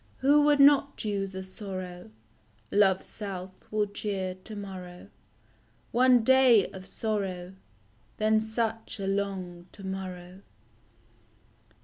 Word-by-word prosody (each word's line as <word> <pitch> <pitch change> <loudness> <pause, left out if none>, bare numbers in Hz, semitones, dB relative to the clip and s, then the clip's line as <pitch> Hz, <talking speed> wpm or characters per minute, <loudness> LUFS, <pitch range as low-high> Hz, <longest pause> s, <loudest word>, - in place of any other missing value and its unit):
Who 285 +3 +4
would 295 -1 +4
not 280 0 +5
choose 195 -2 -3
a 190 - -4
sorrow 185 - -7 0.6
Love's 195 -2 +3
self 190 -3 -7
will 215 -1 +1
cheer 200 -2 -3
to 185 +4 -9
morrow? 185 -3 -8 0.8
One 250 0 +5
day 255 -4 +6
of 190 0 -10
sorrow 195 -4 -3 0.6
Then 215 0 +3
such 225 0 -3
a 195 - -3
long 190 -3 -3
to 200 - -12
morrow 185 -1 -6
200 Hz, 110 wpm, -28 LUFS, 185-220 Hz, 0.8 s, day